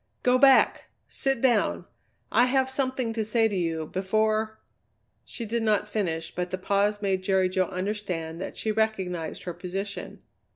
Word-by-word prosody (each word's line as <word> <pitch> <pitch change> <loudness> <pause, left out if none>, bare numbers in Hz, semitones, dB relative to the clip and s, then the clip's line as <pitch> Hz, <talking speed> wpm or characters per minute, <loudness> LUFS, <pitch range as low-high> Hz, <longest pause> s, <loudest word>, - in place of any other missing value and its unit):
"Go 250 0 +4
back! 270 0 +5 0.2
Sit 270 -3 -1
down! 255 -3 +2 0.5
I 245 - +5
have 265 0 +1
something 260 -3 -1
to 225 -1 -1
say 225 +1 +2
to 205 - -3
you 165 -3 -1
before 215 +5 0 0.3
" - - -46
She 235 - -7
did 230 +2 -1
not 210 -1 +1
finish, 165 -7 -2
but 180 0 -3
the 185 - -3
pause 205 +2 0
made 190 -1 +1
Jerry 190 -1 +2
Jo 185 0 +1
understand 185 -4 -4
that - - -6
she 220 - -1
recognized 190 -6 -2
her 175 - -4
position. 190 +3 -6
205 Hz, 165 wpm, -26 LUFS, 185-225 Hz, 0.5 s, back